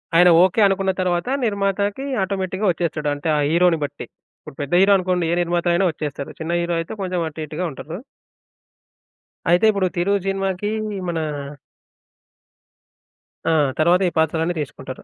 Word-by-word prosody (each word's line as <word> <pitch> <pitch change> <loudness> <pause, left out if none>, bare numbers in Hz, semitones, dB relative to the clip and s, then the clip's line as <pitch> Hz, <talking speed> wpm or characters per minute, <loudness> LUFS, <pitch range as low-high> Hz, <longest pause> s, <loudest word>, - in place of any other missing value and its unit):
ఆయన 175 +1 +7
ఓకే 190 +4 +2
అనుకున్న 195 0 +1
తరువాత 180 +4 0 0.2
నిర్మాతకి 200 +3 -1 0.2
ఆటోమేటిక్‌గా 190 +1 -2
వొచ్చేస్తడు. 155 -3 -2
అంటే 145 +3 -5
ఆ - - +1
హీరో‌ని 170 0 +3
బట్టి. 145 - -5 0.4
ఇప్పుడు - - -12
పెద్ద 145 +3 -4
హీరో 195 +1 +5
అనుకోండి, 180 -2 0
ఏ - - +2
నిర్మాత 175 0 -1
అయినా 180 +3 +2
వొచ్చేస్తడు. 145 -3 -5
చిన్న 160 +1 -3
హీరో 170 0 -1
అయితే 165 - -5
కొంచెం 185 -1 -2
అటు 155 - -12
ఇటుగా 155 +4 -4
ఉంటరు. 155 +5 -7 1.5
అయితే 175 +5 +4
ఇప్పుడు 200 -3 0
'తిరు' 185 +3 +1
సినిమా‌కి 195 +1 -1 0.4
మనా 165 -2 -1 2.3
ఆ! - - +3 0.3
తర్వాత 175 +4 +4
ఈ - - -14
పాత్రలన్నీ 160 +2 0
తీసుకుంటారు. 130 -3 -8
175 Hz, 145 wpm, -21 LUFS, 160-190 Hz, 2.3 s, ఆయన